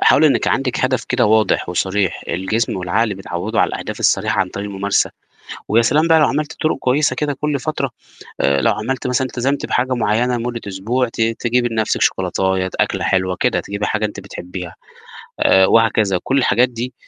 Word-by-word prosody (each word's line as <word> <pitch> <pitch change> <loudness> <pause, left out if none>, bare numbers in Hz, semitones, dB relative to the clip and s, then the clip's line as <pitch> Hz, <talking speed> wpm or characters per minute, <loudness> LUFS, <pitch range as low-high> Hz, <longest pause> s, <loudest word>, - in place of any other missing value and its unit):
حاولي 155 - +5
إنِك 140 - +2
عندِك 130 -1 0
هدف 130 -2 0
كده 125 -1 +1
واضح 110 -3 +2
وصريح، 95 +1 -1
الجسم 95 +5 -1
والعقل 100 +4 0
بيتعوّدوا 95 +3 -3
على - - +3
الأهداف - - -6
الصريحة - - +2
عن - - 0
طريق 100 +1 -6
الممارسة، 100 0 0 0.6
ويا 115 +3 +4
سلام 150 +8 +2
بقى 165 -1 +6
لو 150 - +5
عملتِ 150 +2 -2
طرق 155 - +1
كويسة 135 +4 +1
كده 150 -1 -1
كلّ 150 -1 0
فترة 140 -2 -2 0.5
آآ 70 0 +2
لو - - +3
عملتِ 130 +4 -3
مثلًا 125 +1 0
التزمتِ 130 +3 -2
بحاجة 130 +1 0
معيّنة 120 +2 +1
لمدة 120 0 -4
أسبوع، 115 +7 -1
ت 115 - -8
تجيبي 120 +2 +1
لنفْسِك 110 -2 -1
شوكولاتية، 95 -1 0
أكلة - - 0
حلوة، 95 -1 0
كده، - - +1
تجيبي 100 +1 -4
حاجة 110 0 -1
أنتِ 105 - -4
بتحبيها 90 -1 -8 0.7
آآ، 95 0 +5
وهكذا، 110 -3 +3
كلّ 135 - +1
الحاجات 125 -1 +3
دي 120 +1 -6
115 Hz, 180 wpm, -18 LUFS, 95-130 Hz, 0.7 s, بقى